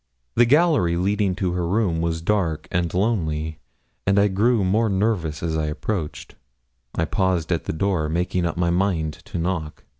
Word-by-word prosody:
The 120 0 +4
gallery 145 - +3
leading 100 +1 +1
to 95 -1 -1
her 90 -1 -1
room 90 -4 +1
was 80 -1 -2
dark 85 -6 0
and 85 -3 0
lonely, 80 -6 -1 0.5
and 100 0 +3
I 100 0 +4
grew 105 +3 +2
more 110 +4 +2
nervous 95 -7 0
as 80 -1 -1
I 80 -1 0
approached; 80 +1 -4 0.6
I 80 - +1
paused 90 -1 0
at 85 - 0
the - - -2
door, 80 -2 0
making 85 +1 0
up 85 - -4
my 85 0 +1
mind 85 -4 0
to - - -6
knock. 85 -3 -3
90 Hz, 175 wpm, -23 LUFS, 80-100 Hz, 0.6 s, The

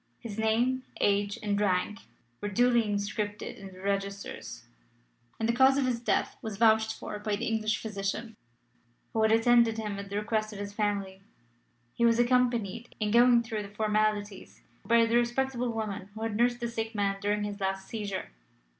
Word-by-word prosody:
His 220 -2 -7
name, 235 +4 +2 0.2
age, 205 0 +1
and 205 -1 0
rank 200 +1 +1 0.4
were 205 - -2
duly 240 +2 +3
inscribed 205 +1 -2
in 195 - -8
the 185 0 -13
registers, 200 0 -4 0.8
and 225 - 0
the 235 - +2
cause 265 +2 +5
of 275 - +2
his 245 -2 0
death 235 - 0
was 220 -3 -5
vouched 220 0 +4
for 210 - -7
by 210 0 -1
the 230 +4 -3
English 220 -1 0
physician 210 +1 -4 0.8
who 225 - +1
had 220 0 +4
attended 225 0 +4
him 210 -2 -3
at 200 0 -7
the 200 - -5
request 215 0 -1
of - - -8
his 205 0 -5
family. 200 -2 -2 0.7
He 235 - -1
was 230 -1 +5
accompanied, 240 -2 +1
in 210 -1 0
going 240 +1 +6
through 220 -2 -3
the 200 - -8
formalities, 210 -1 -1 0.2
by 235 0 +4
the 230 +1 +2
respectable 245 +1 0
woman 210 -4 -4
who 220 - -5
had 225 -2 -2
nursed 240 +2 +2
the 235 - -1
sick 225 -1 -4
man 200 -1 0
during 205 +1 0
his 205 0 -4
last 195 0 -2
seizure. 205 - -4
215 Hz, 180 wpm, -29 LUFS, 205-235 Hz, 0.8 s, going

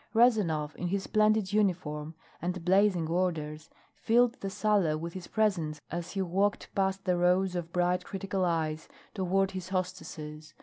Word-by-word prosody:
Rezanov, 185 -11 +3
in 175 - -2
his 195 +2 -1
splendid 215 -2 +2
uniform 165 -7 0 0.3
and 180 0 -3
blazing 190 -3 +3
orders, 160 -3 -2 0.2
filled 240 +1 +3
the 195 - -2
sala 195 -6 +2
with 170 +2 -5
his 185 -2 -7
presence 175 -9 0
as 175 +1 -4
he 195 -1 0
walked 195 +3 0
past 195 0 0
the 180 -2 +2
rows 180 +1 +3
of 170 -1 -4
bright 180 +1 +1
critical 195 0 -3
eyes 160 -3 -1 0.2
toward 195 0 +1
his 185 -1 -6
hostesses. 155 -5 -5
180 Hz, 155 wpm, -30 LUFS, 165-195 Hz, 0.3 s, Rezanov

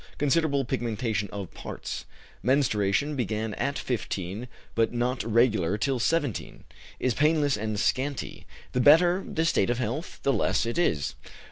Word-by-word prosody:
Considerable 145 -1 +2
pigmentation 115 -5 -2
of 100 -3 -6
parts. - - -6 0.4
Menstruation 130 +1 +2
began 110 -3 -2
at 140 +6 -1
15, 105 -2 -3 0.3
but 115 -1 +2
not 120 +1 -1
regular 110 -5 +2
till 130 +3 0
17; 145 -1 -1 0.4
is 130 - +1
painless 150 0 +3
and 110 -1 -2
scanty; 135 +3 -1 0.2
the 125 - 0
better 175 +7 +6
the 160 - 0
state 140 -11 +2
of 120 - +1
health, 130 - -3
the 140 - +3
less 105 -1 +1
it 115 +7 -2
is. 75 - +1
120 Hz, 140 wpm, -27 LUFS, 110-140 Hz, 0.4 s, better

